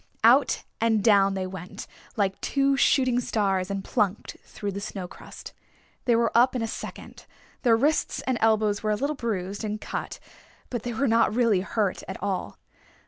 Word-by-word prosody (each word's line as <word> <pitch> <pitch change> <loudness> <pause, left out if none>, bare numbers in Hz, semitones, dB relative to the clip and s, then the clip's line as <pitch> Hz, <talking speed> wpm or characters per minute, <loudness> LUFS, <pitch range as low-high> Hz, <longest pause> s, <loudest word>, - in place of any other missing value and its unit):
Out - - +5 0.2
and 220 -3 +2
down 195 -3 +4
they 190 -1 -2
went 185 -1 -8 0.3
like 195 -3 -1
two 275 0 +2
shooting 255 -3 +3
stars 195 -5 0
and 195 -1 -3
plunked 205 0 -1
through 205 -1 -5
the 200 - -5
snowcrust. 190 -3 -8 0.5
They 240 - +4
were 230 0 +1
up 250 +2 +5
in 240 - -1
a - - -1
second. - - -8 0.3
Their 230 -3 +4
wrists 295 +6 +1
and 255 -3 0
elbows 215 -2 +2
were 215 - -1
a 210 - +2
little 285 +7 -1
bruised 205 -5 -3
and 210 0 -3
cut, - - -5 0.5
but 240 -3 -2
they 240 +1 -4
were 275 +5 0
not 225 -2 +3
really 230 -6 +3
hurt 205 -1 -1
at 190 - -5
all. 190 - -3
215 Hz, 175 wpm, -26 LUFS, 195-235 Hz, 0.5 s, Out